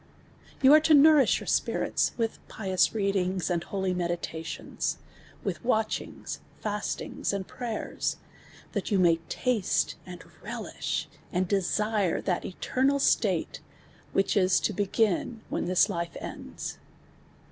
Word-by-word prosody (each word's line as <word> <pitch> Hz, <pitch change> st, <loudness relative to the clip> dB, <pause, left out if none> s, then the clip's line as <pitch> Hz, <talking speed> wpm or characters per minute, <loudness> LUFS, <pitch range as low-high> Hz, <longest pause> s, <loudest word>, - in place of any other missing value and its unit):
Vou 265 Hz, +2 st, +8 dB
are 305 Hz, -, +9 dB
to 310 Hz, 0 st, +5 dB
nourish 295 Hz, -1 st, +6 dB
\our -, -, -8 dB
sj)iri(s -, -, 0 dB
with 225 Hz, -2 st, -1 dB
picnis 190 Hz, 0 st, +1 dB
read 200 Hz, -2 st, +1 dB
ini;s, 185 Hz, -1 st, 0 dB
and 170 Hz, -1 st, -1 dB
holy 190 Hz, -1 st, -1 dB
me(lila(ions, 170 Hz, -2 st, -3 dB, 0.5 s
wi(h -, -, -1 dB
wa(chini;s, 220 Hz, -3 st, -1 dB, 0.2 s
fas(ini;s, 210 Hz, -1 st, -3 dB
and 200 Hz, -2 st, -3 dB
prayers, 235 Hz, -3 st, -3 dB, 0.6 s
(hat 200 Hz, -4 st, -2 dB
you 200 Hz, -, +2 dB
may 170 Hz, -3 st, +5 dB
(asle. 210 Hz, +5 st, 0 dB
and 180 Hz, -1 st, -9 dB, 0.2 s
relish, -, -, -4 dB, 0.2 s
and 185 Hz, +1 st, 0 dB
de 195 Hz, +1 st, +2 dB
sire, 210 Hz, -1 st, +1 dB
(ha( 180 Hz, -3 st, +1 dB
e(ernal 260 Hz, +8 st, 0 dB
s(a(t«, 280 Hz, -, +1 dB, 0.6 s
wliich 195 Hz, -, +2 dB
is 185 Hz, -2 st, +4 dB
(o 215 Hz, -, -5 dB
l)ei; 200 Hz, 0 st, -1 dB
in 220 Hz, +3 st, -1 dB
when -, -, -1 dB
this 185 Hz, +2 st, +4 dB
life 170 Hz, -4 st, -3 dB
ends. -, -, -7 dB
195 Hz, 135 wpm, -28 LUFS, 180-225 Hz, 0.6 s, are